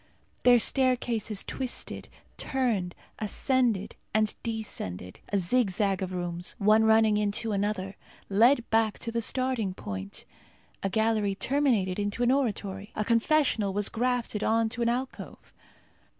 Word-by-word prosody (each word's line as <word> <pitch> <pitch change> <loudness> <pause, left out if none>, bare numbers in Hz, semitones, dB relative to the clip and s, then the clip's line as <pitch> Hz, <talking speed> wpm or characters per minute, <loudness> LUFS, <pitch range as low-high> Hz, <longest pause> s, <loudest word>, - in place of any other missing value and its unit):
Their 245 -1 +6
staircases 240 -4 0
twisted, 260 -2 -4 0.3
turned, 225 -10 -1 0.2
ascended, 225 -1 0 0.2
and 215 0 +2
descended. 95 - -5
A 200 - +1
zigzag 195 -1 +1
of 185 -1 -3
rooms, 175 -1 -3
one 215 +2 +4
running 220 -1 +4
into 210 +2 -1
another, 200 -1 -2 0.3
led 235 +5 +4
back 220 -1 +2
to 230 - -5
the 230 0 -1
starting 240 -5 0
point. 95 - -6 0.6
A 195 - -1
gallery 220 -1 +1
terminated 230 -8 +1
in 205 0 -1
an 245 0 +3
oratory. 205 -7 -2
A 215 - -1
confessional 230 -3 +2
was 205 0 0
grafted 240 -3 -1
on 225 0 +2
to 240 - -5
an 235 - +2
alcove. 255 +2 -5
220 Hz, 130 wpm, -28 LUFS, 195-240 Hz, 0.6 s, Their